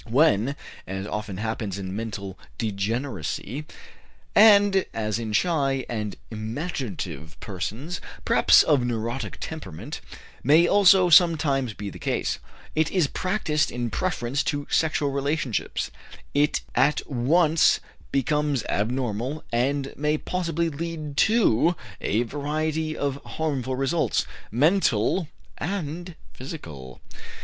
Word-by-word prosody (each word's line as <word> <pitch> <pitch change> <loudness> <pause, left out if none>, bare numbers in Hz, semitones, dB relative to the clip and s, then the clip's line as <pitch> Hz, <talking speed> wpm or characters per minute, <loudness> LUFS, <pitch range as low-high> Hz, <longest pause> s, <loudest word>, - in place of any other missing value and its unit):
When, 130 -1 +3 0.3
as 95 +1 -4
often 105 -2 -4
happens 110 -2 -3
in 95 -1 -5
mental 100 -4 -5 0.2
degeneracy, 110 - -3 0.7
and 205 -3 +7
as 110 0 -1
in 110 -2 -4
shy 135 0 +1
and 105 -3 -3 0.2
imaginative 110 - -5
persons, 110 - -5 0.2
perhaps - - +6
of 140 -5 +3
neurotic 115 -1 -3
temperament, 95 - -7 0.4
may 155 +6 +6
also 190 -2 +6
sometimes 150 - +4
become 100 -1 -5
the - - -10
case, - - -1 0.3
it 155 0 +2
is 180 -5 +2
practiced 160 -1 0
in 120 -2 -3
preference 140 - -1
to 145 -2 -1
sexual 155 -3 +2
relationships, 140 -3 -1 0.4
it 145 +1 +2
at 135 +4 +2
once 155 +5 +3 0.3
becomes 145 -1 +1
abnormal 125 +5 -1
and 135 +3 0
may 150 +1 +1
possibly 170 -1 -1
lead 155 -1 -5
to 180 - +4 0.3
a 110 +4 +1
variety 155 +4 -2
of 140 -1 -2
harmful 135 -5 -2
results, 135 +6 +1 0.2
mental 150 - +2 0.3
and 175 -1 -4 0.2
physical. 80 - -8
140 Hz, 110 wpm, -25 LUFS, 110-160 Hz, 0.7 s, and